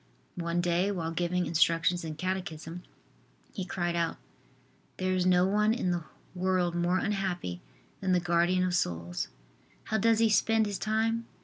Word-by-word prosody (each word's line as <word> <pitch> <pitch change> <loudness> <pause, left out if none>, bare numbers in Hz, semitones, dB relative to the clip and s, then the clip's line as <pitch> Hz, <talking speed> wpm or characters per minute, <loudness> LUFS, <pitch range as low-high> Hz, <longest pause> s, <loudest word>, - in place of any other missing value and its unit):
One 170 0 0
day 175 +2 +1
while 165 -4 -2
giving 175 +1 0
instructions 170 +1 +2
in 160 -2 -5
catechism, 175 -1 -4 0.7
he 195 - -3
cried 175 -2 -2
out: 170 -1 0 0.8
"There 185 0 0
is 185 -1 +1
no 180 0 +5
one 210 +3 +2
in 185 -7 0
the 175 -2 -2 0.3
world 185 -1 +1
more 175 +1 +1
unhappy 190 - -2 0.4
than 190 -1 -1
the 180 - +4
guardian 175 +1 +2
of 180 -1 0
souls. 85 - -1 0.6
How 220 - -1
does 225 +2 +4
he 225 0 +4
spend 220 +1 +3
his 205 -2 -3
time? 225 +1 0
180 Hz, 155 wpm, -29 LUFS, 170-195 Hz, 0.8 s, no